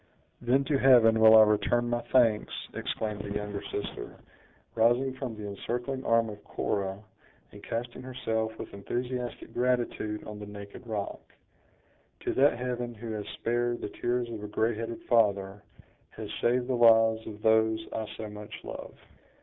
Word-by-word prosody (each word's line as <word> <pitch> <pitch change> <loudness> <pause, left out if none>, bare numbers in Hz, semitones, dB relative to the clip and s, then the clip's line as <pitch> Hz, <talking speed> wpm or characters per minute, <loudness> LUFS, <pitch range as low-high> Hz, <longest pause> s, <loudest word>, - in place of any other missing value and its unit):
"Then 125 +3 +3
to 140 -1 +1
Heaven 115 -4 +6
will 110 0 +9
I 110 - +10
return 105 +3 +2
my 120 0 0
thanks!" 115 -5 +3 0.2
exclaimed 105 -1 -3
the 100 0 -5
younger 105 -1 -3
sister, 100 - -5 0.6
rising 120 +4 +3
from 130 -3 -5
the 105 -1 -6
encircling 120 +6 -4
arm 115 0 +3
of 105 -1 -10
Cora, 100 0 -2 0.5
and - - -13
casting 120 +2 -4
herself 110 -4 -3
with - - -8
enthusiastic 125 +4 -4
gratitude 120 -4 -1
on 105 -1 -8
the 105 - -8
naked 100 +4 -10
rock; 105 -3 -4 1.0
"to - - -1
that 140 0 +4
Heaven 120 -1 -3
who 115 +1 -7
has 105 -2 -4
spared 120 0 -1
the - - -4
tears 120 +3 -1
of 110 -2 -6
a - - -4
gray 110 +2 +1
headed 115 +1 -5
father; 100 -4 +2 0.6
has - - -6
saved 125 +1 +2
the 130 - -1
lives 115 -2 +5
of 105 -1 -9
those 110 0 +3
I 110 -1 -3
so 110 - -5
much 105 0 -9
love." - - -8
115 Hz, 160 wpm, -29 LUFS, 105-120 Hz, 1.0 s, I